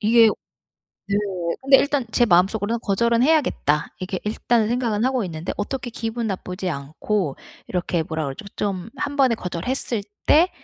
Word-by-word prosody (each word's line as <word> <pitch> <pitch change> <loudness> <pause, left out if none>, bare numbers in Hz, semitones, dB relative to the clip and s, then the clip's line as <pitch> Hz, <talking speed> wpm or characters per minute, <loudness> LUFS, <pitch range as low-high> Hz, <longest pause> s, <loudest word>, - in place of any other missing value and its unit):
이게 225 +1 +6 0.8
네 200 0 +1 0.4
근데 270 0 +7
일단 285 -3 +1
제 240 - +4
마음속으로는 205 +4 +2
'거절은 235 +4 +2
해야겠다.' 260 - +2
이렇게 185 0 -3
일단은 220 +1 +1
생각은 230 -3 0
하고 260 -3 +1
있는데 165 -2 -4
어떻게 250 +5 -3
기분 230 0 -3
나쁘지 185 -1 -3
않고 155 +3 -2 0.3
이렇게 175 -2 -1
뭐라 160 -1 -3
그러죠? 135 +8 -6
좀 195 0 -2
1 280 +1 -3
번에 265 -4 +4
거절했을 210 +4 -2 0.2
때 335 +5 +6
215 Hz, 345 characters per minute, -23 LUFS, 180-245 Hz, 0.8 s, 근데